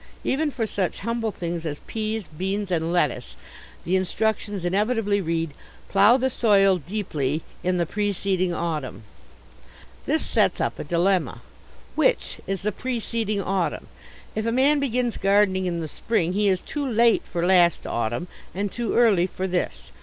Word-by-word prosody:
Even 295 +3 +1
for 240 -5 -2
such 195 -4 -2
humble 230 +1 -1
things 170 -3 -4
as 150 -3 -3
peas, 220 -1 -3
beans, 190 +5 -3
and 165 -1 0
lettuce 150 -8 0 0.5
the 180 - +1
instructions 205 0 -1
inevitably 205 +2 +1
read, 165 -2 -1 0.4
"plough 205 +5 +6
the 260 0 +1
soil 195 -5 +4
deeply 155 -5 -2 0.2
in 180 0 +1
the 170 - +1
preceeding 195 -1 0
autumn." 155 -9 -3 1.0
This - - +1
sets - - +2
up - - -1
a - - -3
dilemma. 170 -6 +1 0.5
Which - - +1
is 195 0 -3
the 210 - +1
preceeding 225 -3 -2
autumn? 190 -2 -1 0.4
If 220 +1 -2
a - - +2
man 275 +5 +3
begins 250 -3 0
gardening 195 -1 +3
in 170 -1 -2
the 160 - -3
spring 180 +1 -1
he 205 +1 +2
is 185 -2 +1
too 295 - -4
late 235 -3 +3
for 170 0 -2
last 175 -2 +4
autumn 120 +9 -2 0.3
and 200 +1 -2
too 235 -3 -2
early 205 -7 +4
for 185 0 -4
this. 180 -1 -3
195 Hz, 155 wpm, -24 LUFS, 175-220 Hz, 1.0 s, plough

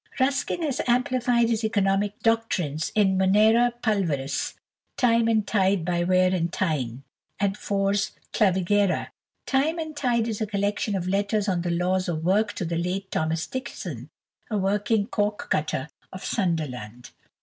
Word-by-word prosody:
Ruskin 275 +5 0
has 285 -3 -1
amplified 245 -1 +2
his 225 -1 0
economic 205 -1 +1
doctrines 190 -10 0
in 190 -3 +3
"Munera 215 +5 +4
Pulveris," 165 - -1 0.4
"Time 230 -2 +3
and 220 -2 +2
Tide 195 -4 +1
by 175 -1 0
Wear 185 +1 +3
and 170 -2 0
Tyne," 135 -9 -2 0.4
and 195 -1 +1
"Fors 200 -1 0 0.2
Clavigera." 195 0 +2 0.4
"Time 285 +5 +1
and 315 -2 -5
Tide" 240 -5 +1
is 220 -1 -3
a 215 - 0
collection 205 0 -1
of 180 -2 -2
letters 200 +2 0
on 180 -3 +1
the 175 - -2
laws 180 +2 0
of 160 -2 -2
work 205 +4 +2
to 190 - -4
the 165 0 -2
late 185 +3 -3
Thomas 160 +1 -1
Dixon, 260 0 -6 0.4
a 215 - -1
working 205 +2 +1
corkcutter 200 - -1 0.2
of 185 - -8
Sunderland. 130 - -3
200 Hz, 145 wpm, -25 LUFS, 180-225 Hz, 0.4 s, Munera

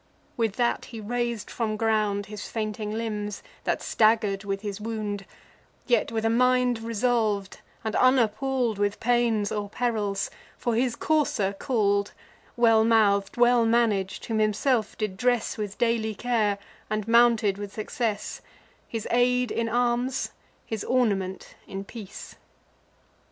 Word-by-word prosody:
With 225 -4 0
that 240 -1 0
he 230 - -8
rais'd 235 0 -3
from 220 -2 -2
ground 210 -2 +1
His 210 0 -7
fainting 215 -1 -3
limbs, 210 -2 -3 0.2
that - - 0
stagger'd 215 -3 +2
with 195 -1 -3
his 205 -1 -5
wound; 210 -3 -4 0.6
Yet, 235 -3 +2
with 225 -1 -1
a - - +4
mind 250 0 +3
resolv'd, 225 -3 0 0.2
and 220 -1 -2
unappall'd 250 -2 +2
With 205 0 0
pains 230 -3 +2
or 205 -1 -3
perils, 215 -4 -1 0.3
for 240 - -1
his 240 +1 +1
courser 280 -11 +1
call'd 205 -3 0 0.4
Well 225 -2 +5
mouth'd, 210 -2 +3
well 240 0 +5
manag'd, 225 -4 +1
whom 220 -1 -1
himself 215 +2 +1
did 210 -4 -3
dress 245 +2 +1
With 210 -3 -5
daily 230 -2 +1
care, 220 -3 +1 0.3
and 215 0 -2
mounted 230 -3 +4
with 205 -1 -6
success; 215 0 -3 0.5
His 225 -2 -4
aid 250 0 +2
in 230 0 -1
arms, 245 +2 0 0.3
his 220 -2 -4
ornament 200 -7 0
in 195 0 -5
peace. 205 -1 -9
220 Hz, 135 wpm, -26 LUFS, 205-240 Hz, 0.6 s, Well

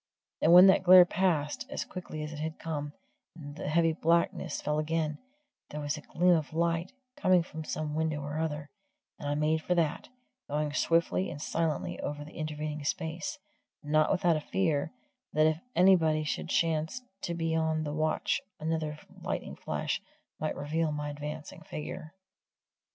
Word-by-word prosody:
And 165 - +5
when 180 +2 +10
that 190 - +6
glare 185 -1 +9
passed, 175 - 0
as - - -3
quickly 165 -4 -6
as 150 +1 -6
it 150 - -7
had 160 +1 -4
come, 150 -2 -4 0.4
and 145 -3 -9
the - - -5
heavy 165 +1 +3
blackness 165 0 +1
fell 150 0 -1
again, 155 -1 -1 0.5
there 150 - -5
was 145 -1 -2
a 150 - -8
gleam 180 +4 +3
of 160 -2 -1
light, 170 +1 0 0.2
coming 185 -2 +4
from 160 -2 -7
some 155 -1 -3
window 155 -1 0
or 145 +2 -4
other, 150 -2 -2 0.5
and 145 - -4
I 145 - 0
made 155 +1 +1
for 180 - 0
that, 160 -3 0 0.4
going 150 0 -1
swiftly 170 +4 +2
and - - -7
silently 160 0 -1
over 145 0 -4
the 155 - -12
intervening 150 -1 -4
space, 160 - -3 0.5
not 155 +1 +3
without 175 -2 +3
a - - -4
fear 155 -4 0 0.4
that 155 0 +4
if 155 0 +2 0.2
anybody 165 -4 +5
should 150 - -3
chance 165 +9 0 0.2
to 170 - -3
be 165 -1 -1
on 160 -1 +1
the 150 -1 -3
watch 155 0 0 0.2
another 155 -1 -2 0.2
lightning - - -4
flash - - -2 0.4
might 155 - -2
reveal 155 +2 -1
my 150 0 -3
advancing 150 +4 -7
figure. 155 +1 -7
155 Hz, 165 wpm, -30 LUFS, 150-165 Hz, 0.5 s, when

